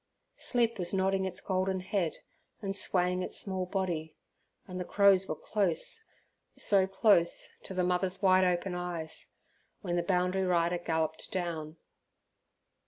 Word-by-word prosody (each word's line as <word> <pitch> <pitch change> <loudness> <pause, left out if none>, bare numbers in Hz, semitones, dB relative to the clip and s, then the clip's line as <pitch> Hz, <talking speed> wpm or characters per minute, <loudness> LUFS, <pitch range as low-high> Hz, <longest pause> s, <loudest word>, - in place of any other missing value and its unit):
Sleep 235 -3 +1
was 175 +1 0
nodding 190 0 +1
its 190 - -4
golden 185 0 -1
head 185 -3 -1 0.4
and 195 -2 -3
swaying 180 -2 +2
its - - -3
small 190 -2 -2
body, 175 -5 -2 0.5
and 185 -1 -6
the - - -2
crows 195 0 +4
were 155 - -2
close, 205 - -1 0.5
so 195 -2 +4
close, 195 -3 +3
to 190 - -8
the 180 - +1
mother's 180 +1 0
wide 185 -2 +5
open 180 +1 0
eyes, 175 -3 -4 0.5
when 175 -3 -2
the - - +2
boundary 180 +1 +1
rider 175 -1 +1
galloped 160 -2 -2
down. 165 -3 -3
185 Hz, 140 wpm, -30 LUFS, 175-190 Hz, 0.5 s, wide